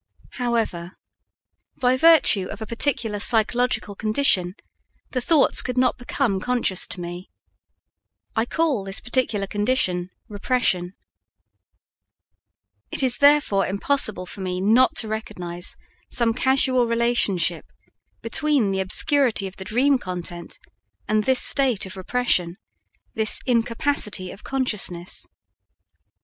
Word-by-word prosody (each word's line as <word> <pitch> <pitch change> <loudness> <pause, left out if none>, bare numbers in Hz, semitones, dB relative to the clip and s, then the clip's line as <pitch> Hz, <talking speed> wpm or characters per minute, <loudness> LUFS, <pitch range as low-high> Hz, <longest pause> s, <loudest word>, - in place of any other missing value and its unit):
However, 225 -8 -2 0.8
by 255 -1 +2
virtue 285 - +4
of - - -8
a 220 - -6
particular 230 -2 0
psychological 225 0 +2
condition, 205 -4 0 0.6
the 255 - -2
thoughts 300 +3 +3
could 250 0 -5
not 255 0 +1
become 245 -5 -1
conscious 240 -4 0
to - - -7
me. 175 +2 -8 1.1
I 225 +1 0
call 305 -10 0
this 195 0 -2
particular 245 -5 -1
condition 200 -4 0 0.2
"Repression." 200 -4 -1 1.9
It - - -3
is 255 -2 +3
therefore 285 -9 +3
impossible 200 -1 0
for 195 - -9
me 180 -1 -3
not 225 +7 +3
to 225 - -1
recognize 175 -5 -4 0.3
some 235 -2 +2
casual 255 0 +3
relationship 230 -8 0 0.6
between 245 -2 +1
the 190 - -2
obscurity 225 +4 +2
of 190 0 -8
the 190 - -8
dream 260 +5 +2
content 175 -3 -6 0.5
and 215 0 0
this 260 -1 +3
state 260 -8 +2
of 190 - -8
repression 185 -4 -1 0.6
this 220 -1 +3
incapacity 230 - 0
of 200 - -13
consciousness. 210 -9 -3
220 Hz, 115 wpm, -22 LUFS, 190-255 Hz, 1.9 s, virtue